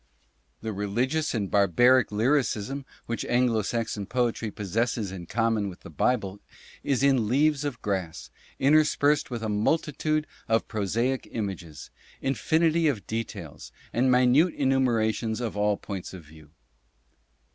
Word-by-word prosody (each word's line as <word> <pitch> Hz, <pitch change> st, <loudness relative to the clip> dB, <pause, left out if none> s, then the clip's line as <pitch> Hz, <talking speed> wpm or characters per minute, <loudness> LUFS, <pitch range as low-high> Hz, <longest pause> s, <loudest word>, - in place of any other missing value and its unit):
The 110 Hz, -1 st, -4 dB
religious 120 Hz, +10 st, -1 dB
and 100 Hz, -4 st, -2 dB
barbaric 120 Hz, +6 st, +4 dB
lyrism 130 Hz, +2 st, 0 dB, 0.2 s
which 115 Hz, -, -3 dB
Anglo 120 Hz, -2 st, +2 dB
Saxon 105 Hz, -2 st, -3 dB
poetry 120 Hz, -2 st, -1 dB
possesses 105 Hz, +1 st, -2 dB
in 90 Hz, -3 st, -8 dB
common 115 Hz, -1 st, 0 dB
with 90 Hz, -, -12 dB
the -, -, -11 dB
Bible 100 Hz, -, 0 dB, 0.4 s
is 135 Hz, -2 st, 0 dB
in 135 Hz, -6 st, +3 dB
"Leaves 145 Hz, +4 st, +2 dB
of 140 Hz, -5 st, -3 dB
Grass" 95 Hz, -6 st, -3 dB, 0.3 s
interspersed 150 Hz, 0 st, +3 dB
with 120 Hz, -3 st, -5 dB
a -, -, -1 dB
multitude 155 Hz, +7 st, 0 dB, 0.2 s
of 115 Hz, 0 st, +1 dB
prosaic 115 Hz, +5 st, -1 dB
images, 95 Hz, -, -6 dB, 0.3 s
infinity 160 Hz, +4 st, +1 dB
of 125 Hz, -9 st, -1 dB
details, 105 Hz, -8 st, -6 dB, 0.2 s
and 130 Hz, +2 st, +2 dB
minute 130 Hz, +7 st, +4 dB
enumerations 115 Hz, -5 st, +1 dB
of 115 Hz, -4 st, -3 dB
all 105 Hz, 0 st, +1 dB
points 95 Hz, -2 st, -7 dB
of 90 Hz, -, -10 dB
view. 75 Hz, 0 st, -16 dB
115 Hz, 130 wpm, -26 LUFS, 105-135 Hz, 0.4 s, barbaric